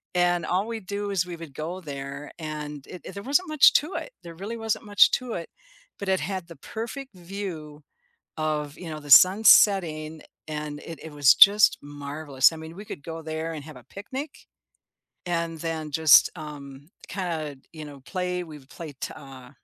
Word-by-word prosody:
and 175 Hz, -1 st, +2 dB
all 190 Hz, +4 st, 0 dB
we 230 Hz, -1 st, -4 dB
do 200 Hz, +1 st, -4 dB
is 185 Hz, -3 st, +1 dB
we 175 Hz, -1 st, -7 dB
would 165 Hz, -4 st, -10 dB
go 165 Hz, +6 st, -5 dB
there 140 Hz, -1 st, -7 dB
and 150 Hz, -2 st, -6 dB
it 180 Hz, -4 st, -10 dB
there 200 Hz, -, -7 dB
wasn't 290 Hz, -, +1 dB
much 305 Hz, -2 st, +7 dB
to 310 Hz, +6 st, +1 dB
it -, -, -5 dB
there 170 Hz, -1 st, -10 dB
really 205 Hz, +7 st, -6 dB
wasn't 225 Hz, -1 st, -2 dB
much 205 Hz, -1 st, +5 dB
to 250 Hz, -2 st, -2 dB
it, 170 Hz, -, -5 dB, 0.5 s
but 200 Hz, -, -4 dB
it 190 Hz, -1 st, +2 dB
had 190 Hz, -3 st, -4 dB
the 170 Hz, -, -11 dB
perfect 235 Hz, +2 st, -7 dB
view 170 Hz, -5 st, -7 dB, 0.5 s
of, 150 Hz, -2 st, -2 dB
you 175 Hz, -, -8 dB
know, 155 Hz, -1 st, -6 dB
the 145 Hz, -1 st, -12 dB
sun 185 Hz, -, +8 dB
setting 160 Hz, -8 st, +5 dB, 0.3 s
and 150 Hz, -1 st, -5 dB
it 165 Hz, -3 st, -8 dB
it 160 Hz, -, -8 dB
was 145 Hz, -4 st, +5 dB
just 205 Hz, +1 st, +7 dB
marvelous. 145 Hz, -1 st, 0 dB
I -, -, -8 dB
mean, 160 Hz, +1 st, -9 dB
we 205 Hz, +3 st, -9 dB
could 145 Hz, -9 st, -9 dB
go 165 Hz, 0 st, -7 dB
there 160 Hz, +1 st, -4 dB
and 150 Hz, -3 st, -7 dB
have 155 Hz, -, -11 dB
a 125 Hz, -, -15 dB
picnic. 265 Hz, +9 st, -6 dB, 1.0 s
And 170 Hz, -2 st, -2 dB
then 160 Hz, -2 st, -4 dB
just, 160 Hz, +1 st, +6 dB
um, 145 Hz, -2 st, -10 dB, 0.2 s
kinda, 160 Hz, -6 st, -4 dB, 0.2 s
you 155 Hz, -2 st, -8 dB
know, 145 Hz, -2 st, -11 dB
play 180 Hz, -1 st, -2 dB
we've 150 Hz, -5 st, -13 dB
played, 150 Hz, -2 st, -9 dB, 0.2 s
uh, 130 Hz, -3 st, -12 dB
165 Hz, 185 wpm, -25 LUFS, 150-195 Hz, 1.0 s, sun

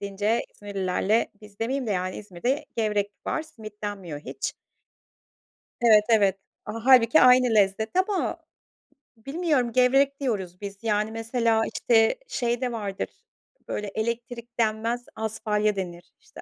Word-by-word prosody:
deyince 205 Hz, +3 st, -1 dB
İzmirlilerle, 200 Hz, +2 st, 0 dB
biz 210 Hz, -1 st, -15 dB
demeyeyim 255 Hz, +3 st, -1 dB
de, -, -, -2 dB
yani 185 Hz, -1 st, -1 dB
İzmir'de 235 Hz, -, -2 dB
gevrek 210 Hz, -2 st, 0 dB, 0.2 s
var. 315 Hz, -, -1 dB
Simit 220 Hz, -10 st, -12 dB
denmiyor 190 Hz, -8 st, -5 dB
hiç. -, -, -5 dB, 1.3 s
Evet, 220 Hz, -3 st, +6 dB
evet. 205 Hz, -4 st, +4 dB, 0.3 s
A 220 Hz, +1 st, -6 dB
hâlbuki 255 Hz, +2 st, +7 dB
aynı 250 Hz, -2 st, +6 dB
lezzet 210 Hz, +1 st, +2 dB
ama 380 Hz, +1 st, 0 dB, 0.8 s
bilmiyorum, 275 Hz, -1 st, 0 dB
gevrek 270 Hz, +3 st, +3 dB
diyoruz 195 Hz, -9 st, -3 dB
biz 200 Hz, -1 st, -6 dB
yani. 215 Hz, -1 st, 0 dB
Mesela 225 Hz, 0 st, +1 dB
işte 225 Hz, -, +3 dB
şey 240 Hz, -, -1 dB
de 250 Hz, -1 st, -1 dB
vardır; 205 Hz, -4 st, -3 dB, 0.6 s
böyle 210 Hz, -, -3 dB
elektrik 235 Hz, +3 st, -4 dB
denmez 230 Hz, +2 st, 0 dB
asfalya 215 Hz, -1 st, 0 dB
denir 175 Hz, -2 st, -6 dB
işte. -, -, -14 dB
220 Hz, 130 wpm, -26 LUFS, 205-245 Hz, 1.3 s, hâlbuki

